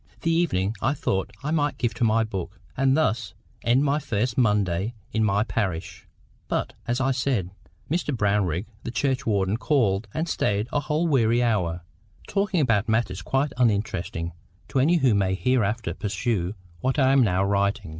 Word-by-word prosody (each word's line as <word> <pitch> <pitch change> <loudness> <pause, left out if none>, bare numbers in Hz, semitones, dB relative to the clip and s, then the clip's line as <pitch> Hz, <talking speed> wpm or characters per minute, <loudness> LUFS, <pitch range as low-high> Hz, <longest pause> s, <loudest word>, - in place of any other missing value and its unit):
The 165 - +1
evening 110 - +1
I 135 +4 +1
thought 95 -7 -1
I 150 - -2
might 145 -2 +1
give 120 -3 -1
to - - -2
my 115 0 +3
books, 95 -2 -5 0.2
and 135 +1 +3
thus 110 -9 0 0.3
end 120 +4 +3
my 145 +1 +2
first 115 -2 -1
Monday 105 -2 +1 0.2
in 110 0 +2
my 100 0 +2
parish; 95 -7 -3 0.4
but, - - -2
as 120 +2 0
I 135 +1 +2
said, 125 -8 -1 0.4
Mr 165 -1 -1
Brownrigg, 100 - +1 0.2
the - - -4
churchwarden, 115 -6 0
called 115 -7 +1
and 160 +7 -2
stayed 105 -8 0
a 145 - +3
whole 150 +3 0
weary 120 -5 +3
hour, 90 -7 0 0.4
talking 195 -4 +1
about 115 -5 +2
matters 110 -5 0
quite 135 - 0
uninteresting 100 -7 0 0.4
to 135 - 0
any 155 +7 +4
who 135 -8 +3
may 95 -2 +1
hereafter 110 -4 0
peruse 100 0 -2 0.2
what 130 - 0
I 135 -2 +4
am 135 0 +5
now 95 -5 +2
writing. 100 -3 0
115 Hz, 165 wpm, -25 LUFS, 100-135 Hz, 0.4 s, am